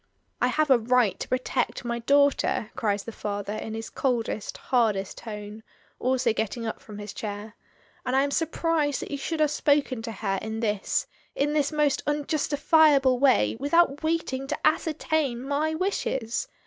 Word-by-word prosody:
"I - - +4
have 310 -2 +1
a 255 - +7
right 235 -4 +2
to - - -4
protect 255 0 -1
my 235 0 -2
daughter," 280 -3 +2
cries 205 -5 0
the 230 - -7
father, 205 -1 -4
in 215 0 -5
his 225 0 -6
coldest, 235 -5 -2
hardest 215 -6 0
tone, 210 -1 -8 0.4
also 255 -2 +1
getting 225 +2 -3
up 225 - -4
from 210 -2 -10
his 205 -1 -7
chair; 210 0 -6 0.5
"and 255 0 -1
I 270 - +4
am 285 - -1
surprised 320 -2 0
that - - -8
you 285 - -2
should 325 +3 -3
have 300 -1 +3
spoken 285 -5 +1
to 225 0 -5
her 195 -2 -2
in 220 +1 -4
this 210 -3 0 0.2
— - - -36
in 295 +2 +1
this 295 -1 +1
most 300 -2 +1
unjustifiable 290 -2 +3
way 270 -1 +4
without 290 +1 +3
waiting 315 -5 -1
to - - -2
ascertain 305 -5 0
my 305 +3 0
wishes. 265 - -1
260 Hz, 170 wpm, -26 LUFS, 220-295 Hz, 0.5 s, a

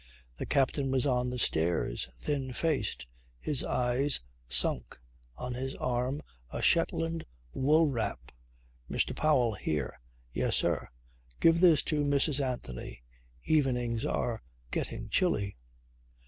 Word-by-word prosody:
The - - -5
captain 135 0 +1
was 130 0 +2
on 125 -2 +1
the 125 - -3
stairs, 85 - +1
thin 135 - -2
faced, 150 - -1 0.3
his 145 -4 +2
eyes 125 +3 +2 0.3
sunk, 60 -1 0 0.4
on 125 0 -4
his 130 +2 -4
arm 125 +3 -1 0.3
a - - -5
Shetland 165 0 +2 0.3
wool 155 +5 +4
wrap. 110 - -2 0.6
"Mr. - - 0
Powell 130 -7 +3
here." 75 -10 -3 0.3
"Yes, - - +1
sir." - - +1 0.5
"Give 165 0 +5
this 170 -4 +6
to 150 -2 0
Mrs. 140 0 +3
Anthony. 65 - -4 0.4
Evenings 125 -6 +1
are 120 -6 -1 0.3
getting - - -3
chilly." 105 - +1
130 Hz, 120 wpm, -30 LUFS, 120-150 Hz, 0.6 s, this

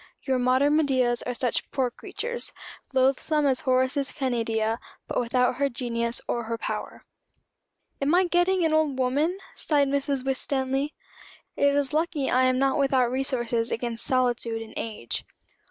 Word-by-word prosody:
Your 260 -2 +1
modern 260 +4 +3
Medeas 255 -5 +2
are 250 - -2
such 245 -1 -1
poor 260 -3 0
creatures 475 - -4 0.4
loathsome 275 +3 +2
as 265 -2 +2
Horace's 260 0 +1
Canidia, 230 -4 -1 0.3
but - - -1
without 250 +1 +1
her 280 0 +1
genius 235 -1 -2
or 235 -1 -1
her 230 +1 -3
power. - - -5 1.0
"I - - +1
am 355 +5 +4
getting 350 0 +3
an 315 - +2
old 310 -4 +2
woman," 285 +8 +1 0.2
sighed 285 -3 +1
Mrs. 280 -1 -1
Winstanley. 270 +1 -1 0.6
"It 280 0 +3
is 285 0 +1
lucky 310 -3 0
I 255 +1 +4
am 255 0 +3
not 270 +1 +2
without 265 -3 +2
resources 240 -3 -1
against 235 0 -2
solitude 240 -3 0
and 220 - -13
age." 165 - -4
260 Hz, 150 wpm, -26 LUFS, 240-285 Hz, 1.0 s, am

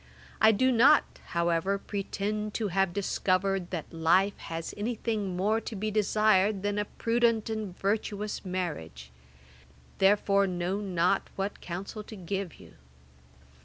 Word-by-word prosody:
I 220 +1 +8
do 260 +5 +3
not, 265 +6 +4
however, 170 +3 +1
pretend 205 +1 -3
to 215 -3 -1
have 195 0 +1
discovered 190 -1 0
that 170 -3 -5
life 170 +5 +3
has 165 0 -5
any 225 +4 -2
thing 210 -5 -2
more 215 +4 +1
to 225 - -6
be 215 +2 -2
desired 210 -1 +2
than 205 0 0
a 210 - 0
prudent 230 0 +1
and 215 -5 -4
virtuous 210 +1 -2
marriage; 150 - -5 0.9
therefore 200 0 +4
know 180 +2 -2
not 185 -1 +1
what 195 +1 -3
counsel 190 +5 -6
to 215 - -9
give 190 -1 -4
you. - - -16
200 Hz, 135 wpm, -29 LUFS, 185-215 Hz, 0.9 s, I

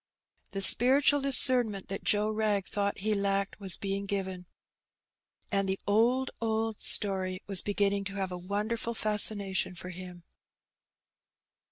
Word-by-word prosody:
The 195 - -6
spiritual 275 +6 +6
discernment 250 -7 +3
that 195 - -6
Joe 210 0 0
Wrag 215 -3 -2
thought 200 -1 -4
he 215 +1 -1
lacked 200 0 -3
was 190 -3 -4
being 200 0 -5
given, 190 -2 -5 1.0
and 195 -1 -1
the 190 - -2
'^old, 240 +5 +1
old 225 -1 -3
story," 190 -2 0
was 195 -3 +3
beginning 200 -1 -2
to 195 0 -8
have 190 -2 -4
a - - -5
wonderftil 215 +5 -4
fascination 205 -3 +2
for 180 +1 -10
him. 180 -1 -11
200 Hz, 135 wpm, -28 LUFS, 195-220 Hz, 1.0 s, spiritual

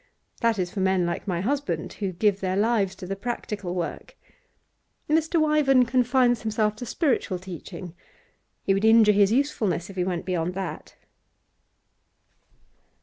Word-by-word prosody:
That 230 -2 +2
is 180 -2 -2
for 200 - -5
men 190 -1 +2
like 170 - -3
my 175 -3 -1
husband, 205 - -2
who 195 -3 -3
give 200 +2 +1
their 185 -1 -1
lives 205 -3 +1
to 185 - -9
the 195 +2 -3
practical 205 -4 -4
work. 175 - -5 0.9
Mr. 320 +2 +2
Wyvern 300 -5 +4
confines 250 0 +2
himself 215 -1 0
to 245 - -7
spiritual 250 - 0
teaching. 180 -1 -9 0.7
He 195 - +2
would 195 +1 -1
injure 220 -1 +6
his 200 0 +4
usefulness 215 - 0
if 195 - -14
he 180 - +1
went 175 -2 -3
beyond 180 -1 -2
that. 190 -2 -6
205 Hz, 145 wpm, -25 LUFS, 185-240 Hz, 0.9 s, injure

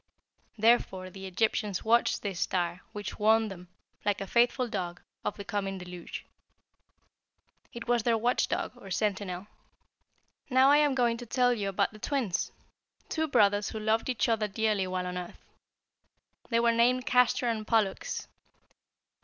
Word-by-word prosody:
Therefore 205 -4 +2
the 195 0 -8
Egyptians 205 0 0
watched 235 +2 +3
this 195 -4 -3
star, 175 -1 -1
which 210 -2 -6
warned 220 0 +3
them, 180 -1 -10 0.4
like 205 -1 +1
a 195 - -4
faithful 240 +4 +2
dog, 180 -6 -4 0.2
of - - -3
the 200 - -7
coming 195 -2 -2
deluge. 180 -1 -8 1.5
It 235 0 -8
was 240 -1 +3
their 230 +1 +2
watch 240 +3 +1
dog - - -2
or 200 -5 -11
sentinel. 190 -1 -2 1.0
"Now 260 +1 +5
I 290 - +7
am 295 -2 +3
going 240 -2 +2
to 245 0 -9
tell 245 +1 +3
you 205 -4 -2
about 195 - 0
the 215 - -12
Twins, 245 -8 -1 0.6
two 315 0 0
brothers 205 -6 +3
who 220 - -5
loved 220 +3 0
each 245 -5 +1
other 225 -2 +1
dearly 210 -2 0
while 185 0 -2
on 180 0 -3
earth. 180 - -10 1.0
They 230 -2 +2
were 235 0 +4
named 245 +2 +3
Castor 250 0 +3
and 220 -2 -2
Pollux. 215 -4 0
215 Hz, 155 wpm, -29 LUFS, 195-235 Hz, 1.5 s, I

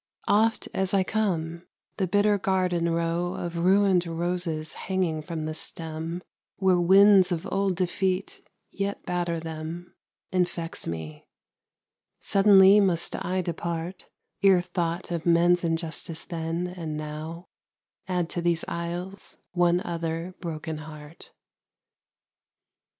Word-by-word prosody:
Oft 220 +3 +2
as 190 +1 0
I 190 - +4
come, 175 -5 -2 0.3
the 190 -3 0
bitter 205 +2 +3
garden 180 -3 +1
row 170 +1 -1
Of 170 -1 -4
ruined 185 0 +4
roses 165 -2 -2
hanging 180 -5 -1
from 155 0 -5
the 155 - -3
stem, 165 +2 -5 0.3
Where 190 -2 +3
winds 195 +1 +6
of 165 -2 -2
old 195 -1 +1
defeat 185 +1 -1 0.3
yet 200 0 -3
batter 175 -2 -1
them, 160 +2 -7 0.4
Infects 175 -2 -1
me: 80 -2 -6 0.9
suddenly 195 0 +6
must 180 -4 +1
I 185 0 -1
depart, 170 +1 -4 0.3
Ere 195 -3 +6
thought 175 0 -3
of 170 -1 -3
men's 175 +1 +4
injustice 165 -1 -2
then, 165 0 -3
and 170 -4 -5
now, 155 +3 -6 0.6
Add 180 -2 0
to 175 - -2
these 170 -1 +1
aisles 175 +3 -5
one 175 0 +3
other 165 0 -3
broken 160 -2 -5
heart. 155 0 -11
175 Hz, 115 wpm, -26 LUFS, 165-185 Hz, 0.9 s, winds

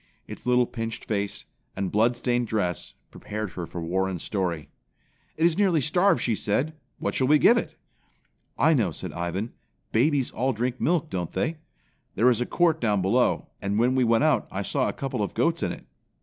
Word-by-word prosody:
Its - - -9
little 125 0 +4
pinched 115 -1 -5
face, 100 -2 -2 0.3
and 95 -1 -2
bloodstained 120 +2 +1
dress 90 -6 -2 0.2
prepared 105 -2 -5
her 85 -2 -6
for 85 - -6
Warren's 95 +1 -1
story. 90 -6 -2 0.7
"It 160 - +3
is 170 +2 +2
nearly 185 -6 +4
starved," 175 +6 +3
she 120 - +1
said. 125 +9 0 0.2
"What - - -2
shall 130 - +1
we 150 +2 +6
give 235 - +6
it?" 235 - -2 0.8
"I 160 - +4
know," 115 - +2
said - - -7
Ivan. 90 +6 -3 0.4
"Babies 135 +3 +2
all 130 +2 0
drink 120 +3 -2
milk, 165 -1 +1
don't 90 -3 -3
they? 160 - -1 0.6
There 120 +5 +5
is 120 - 0
a 125 - -1
court 175 -3 +2
down 105 -5 +1
below, 120 +7 +2
and 100 +1 -1
when 120 +3 +3
we 130 -1 +3
went 115 +2 +3
out 150 -7 +2
I 100 +1 -3
saw 135 +5 0
a - - -2
couple 135 -5 -3
of 100 - -3
goats - - +1
in - - 0
it." - - -9
120 Hz, 190 wpm, -26 LUFS, 100-140 Hz, 0.8 s, we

